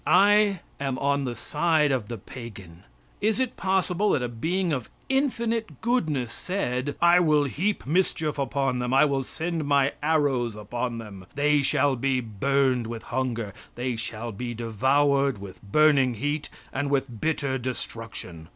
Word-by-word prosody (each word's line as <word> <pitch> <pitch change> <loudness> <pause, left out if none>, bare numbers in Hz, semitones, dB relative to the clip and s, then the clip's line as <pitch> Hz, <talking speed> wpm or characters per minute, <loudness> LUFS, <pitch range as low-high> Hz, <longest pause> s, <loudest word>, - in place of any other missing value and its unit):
I 200 0 +5 0.2
am 135 -2 -2
on 140 0 +1
the 120 -2 -3
side 150 +3 +1
of 125 -6 -1
the 115 - -5
pagan. 100 -7 -10 0.4
Is 215 +1 +2
it 260 -2 0
possible 190 +1 +1
that 130 - +1
a - - 0
being 165 +9 -1
of 130 -6 -3 0.2
infinite 235 - 0
goodness 155 - 0
said: 145 -7 -2
"I 170 +1 +6
will 155 -4 +4
heap 180 +9 -1
mischief 155 -1 0
upon 135 -2 0
them; 125 +1 0
I 135 - +7
will 135 -2 0
send 165 +3 -3
My 140 -1 +3
arrows 145 -7 +1
upon 120 +3 -3
them. 100 -5 -9
They 145 0 +3
shall 140 -1 +2
be 130 +1 +1
burned 125 +2 +1
with 115 -1 -6
hunger; 120 -5 -2 0.2
they 125 0 -2
shall 115 +1 -4
be 120 +3 -5
devoured 135 +4 +2
with 100 -1 -10
burning 135 +2 +4
heat 145 +5 -2 0.2
and 140 +1 -1
with 135 -5 -1
bitter 140 -4 0
destruction. 115 -9 -6
135 Hz, 155 wpm, -26 LUFS, 120-155 Hz, 0.4 s, I